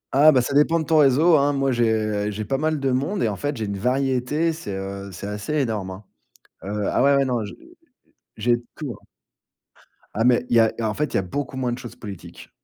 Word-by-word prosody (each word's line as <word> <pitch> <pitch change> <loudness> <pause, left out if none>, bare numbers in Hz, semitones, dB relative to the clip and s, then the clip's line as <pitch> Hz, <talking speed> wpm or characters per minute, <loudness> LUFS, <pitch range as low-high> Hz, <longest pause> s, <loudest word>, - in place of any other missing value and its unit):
Ah, 155 +3 +7
bah, 130 -3 +3
ça 140 - -3
dépend 155 +3 +4
de 160 - -3
ton 160 -1 +3
réseau, 150 +4 +5
hein. 145 +1 +2
Moi, 135 -1 +1
j'ai 110 -3 0
j'ai 105 +1 -5
pas 135 +6 -1
mal 155 -1 0
de 135 -1 0
monde 145 +11 -1
et - - +2
en - - -2
fait, 145 -1 -3
j'ai 110 - -2
une 100 -1 -4
variété, 135 +6 0
c'est, 105 -12 -6
heu, 100 +1 -6
c'est 90 - -8
assez 105 +8 -4
énorme, 110 -9 -1
hein. 95 +3 -9 0.6
Ah 105 +3 -1
ouais, 140 +1 +5
ouais, 140 - +3
non, 120 -5 -1
j'ai - - -9 0.8
j'ai 120 +2 +2
de 120 - -12
tout, 150 -5 -6
hein. - - -26 1.1
Ah, 110 - +1
mais 125 0 +3
il - - +2
y - - +7
a 110 -1 +4
en 110 -1 0
fait, 150 +6 -2
il - - -2
y - - +4
a 95 - 0
beaucoup 135 +7 -4
moins 125 -2 -1
de - - -5
choses 120 -1 -9
politiques. 95 -7 -10
125 Hz, 240 wpm, -23 LUFS, 105-140 Hz, 1.1 s, Ah